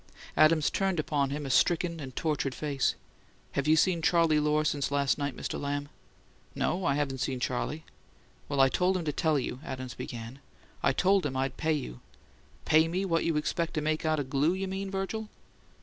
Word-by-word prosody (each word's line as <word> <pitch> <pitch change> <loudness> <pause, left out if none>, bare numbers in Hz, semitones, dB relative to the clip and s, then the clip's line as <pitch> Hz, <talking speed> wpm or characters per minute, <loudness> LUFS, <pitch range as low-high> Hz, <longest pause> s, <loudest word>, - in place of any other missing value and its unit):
Adams 155 -1 +4
turned 190 -4 0
upon 145 -3 0
him 145 +1 -4
a 135 - -2
stricken 170 +5 +2
and 130 -4 -8
tortured 150 -4 -1
face. 145 -3 0 0.6
"Have 140 +1 -1
you 155 - +6
seen 170 +1 +2
Charley 165 -2 +3
Lohr 150 +1 +2
since 145 -2 0
last 140 0 +1
night, 140 -3 -2
Mr. - - -4
Lamb?" 145 0 -3 0.7
"No; 180 +2 -1
I 140 - +2
haven't 140 -2 -1
seen 130 0 -2
Charley." 140 +5 -2 0.6
"Well, 140 -1 -1
I 135 - +7
told 185 +7 +1
him 175 - -4
to 150 - -1
tell 155 0 +2
you," 125 -1 -3
Adams 130 -1 -6
began; 120 +2 -7 0.4
"I - - +3
told 190 +7 +3
him 130 -3 -2
I'd 135 0 -1
pay 160 0 0
you 95 - -4 0.3
" - - -30
"Pay 160 +1 +5
me 185 +4 -1
what 165 -3 +1
you 165 -2 +1
expect 165 +3 -1
to 155 - 0
make 155 +1 -1
out 155 -1 +1
o' - - 0
glue, 140 +5 +1
you 190 +1 -3
mean, 195 +1 -4
Virgil?" 195 +3 -3
150 Hz, 200 wpm, -29 LUFS, 140-170 Hz, 0.7 s, I